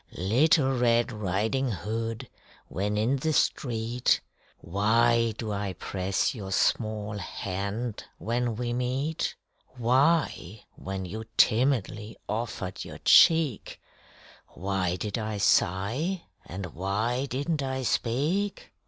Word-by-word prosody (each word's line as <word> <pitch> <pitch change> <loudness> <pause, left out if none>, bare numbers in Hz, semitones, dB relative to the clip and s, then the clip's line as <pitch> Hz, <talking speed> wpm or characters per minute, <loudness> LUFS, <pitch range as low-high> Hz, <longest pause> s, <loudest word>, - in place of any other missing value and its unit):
Little 135 - +3
Red 120 0 +3
Riding 110 +6 -1
Hood, 110 +3 -3 0.4
when 105 +3 -2
in 120 +6 +2
the 155 +4 -1
street, 120 -3 +1 0.4
Why 115 +4 +2
do 110 -3 -4
I 100 -1 -2
press 95 - -1
your 100 -6 -7
small 105 0 0
hand 100 +5 -4
when 120 0 -1
we 120 +1 -2
meet? 130 +6 -1 0.4
Why, 125 - +1
when 95 0 -5
you 110 +5 -6
timidly 110 -3 +2
offered 105 -4 -4
your - - -9
cheek, 160 - +5 0.7
Why 95 -2 -2
did 105 +4 -3
I 110 -1 -3
sigh, 110 - +1 0.2
and 90 -2 -6
why 110 - -1
didn't 145 +4 -2
I 130 -1 -2
speak? 155 - -1
115 Hz, 110 wpm, -27 LUFS, 100-130 Hz, 0.7 s, cheek